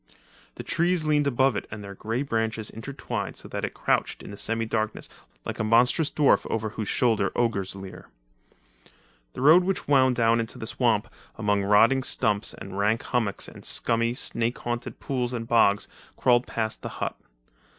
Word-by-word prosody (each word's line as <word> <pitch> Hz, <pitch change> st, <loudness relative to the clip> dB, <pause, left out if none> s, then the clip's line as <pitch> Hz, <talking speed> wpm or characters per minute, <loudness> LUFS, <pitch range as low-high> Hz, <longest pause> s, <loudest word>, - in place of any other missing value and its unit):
The -, -, -7 dB
trees 170 Hz, 0 st, +1 dB
leaned 150 Hz, -1 st, +2 dB
above 130 Hz, -1 st, +2 dB
it -, -, -4 dB
and 105 Hz, -1 st, -7 dB
their 100 Hz, 0 st, -8 dB
grey 115 Hz, +6 st, -3 dB
branches 115 Hz, -4 st, -2 dB
intertwined 135 Hz, +5 st, -5 dB
so -, -, -7 dB
that -, -, -4 dB
it -, -, -3 dB
crouched -, -, 0 dB
in 100 Hz, -, -8 dB
semi 115 Hz, +2 st, -1 dB
darkness 110 Hz, -1 st, -2 dB, 0.4 s
like -, -, -5 dB
a -, -, +1 dB
monstrous 120 Hz, +7 st, +3 dB
dwarf 145 Hz, -3 st, +2 dB
over 110 Hz, -1 st, -1 dB
whose 110 Hz, -1 st, -5 dB
shoulder 110 Hz, -5 st, +1 dB
ogres 100 Hz, -6 st, 0 dB
leer. 95 Hz, -1 st, -10 dB, 1.2 s
The -, -, -6 dB
road, 160 Hz, +6 st, +7 dB
which 195 Hz, +1 st, -2 dB
wound 130 Hz, -3 st, +4 dB
down 115 Hz, 0 st, +3 dB
into 115 Hz, +2 st, -3 dB
the 115 Hz, -, -6 dB
swamp 115 Hz, -1 st, +1 dB, 0.3 s
among 105 Hz, -2 st, +1 dB
rotting 115 Hz, +6 st, +5 dB
stumps 110 Hz, -5 st, 0 dB
and 100 Hz, 0 st, -7 dB
rank 105 Hz, +3 st, +1 dB
hummocks 110 Hz, -5 st, -1 dB
and -, -, -12 dB
scummy, 115 Hz, 0 st, 0 dB
snake 115 Hz, -1 st, -1 dB
haunted 120 Hz, 0 st, -5 dB
pools 125 Hz, -2 st, -2 dB
and 115 Hz, -2 st, -4 dB
bogs, 105 Hz, -4 st, +3 dB, 0.3 s
crawled 120 Hz, 0 st, +3 dB
past 110 Hz, -1 st, -2 dB
the -, -, -5 dB
hut. -, -, -2 dB
115 Hz, 170 wpm, -26 LUFS, 110-125 Hz, 1.2 s, road